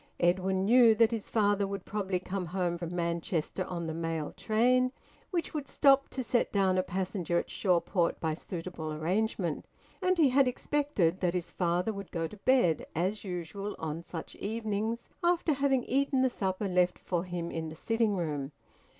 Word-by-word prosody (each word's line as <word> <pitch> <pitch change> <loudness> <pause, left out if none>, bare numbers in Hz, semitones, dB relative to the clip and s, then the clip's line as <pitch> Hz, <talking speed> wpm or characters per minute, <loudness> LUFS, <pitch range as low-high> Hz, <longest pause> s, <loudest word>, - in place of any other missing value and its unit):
Edwin 190 +2 +2
knew 235 0 +7
that 230 +1 +4
his 225 -3 -4
father 205 -2 +2
would 200 -1 -5
probably 195 -3 -1
come 185 0 -4
home 175 0 -1
from 170 0 -5
Manchester 170 +1 -1
on 170 -2 -4
the 160 - -3
mail 165 -2 -3
train, 250 +3 +2 0.4
which 345 -5 -2
would 295 -3 -3
stop 275 -1 +4
to 260 - -4
set 240 0 +1
down 190 -2 +2
a - - +4
passenger 185 -1 -2
at - - -2
Shawport 175 -2 +1
by 160 -1 0
suitable 165 -1 -6
arrangement. 175 +1 -1 0.3
And 370 0 +2
he 305 -5 +5
had 265 +1 +4
expected 250 - 0
that 180 -1 0
his 175 -1 -3
father 180 +4 0
would 200 -1 -7
go 165 -1 -2
to 210 - -12
bed, 200 - +2
as 190 +6 -1
usual 195 +2 -5
on 160 0 -4
such 170 -1 -7
evenings, 220 +1 -2 0.2
after 345 -2 +3
having 270 -2 +2
eaten 270 0 +1
the 260 - +2
supper 190 -1 -2
left 180 -1 +2
for 175 -2 -2
him 175 -2 -4
in 160 -1 -3
the 155 - -9
sitting 225 +3 0
room. 150 -4 -3
190 Hz, 175 wpm, -30 LUFS, 170-230 Hz, 0.4 s, knew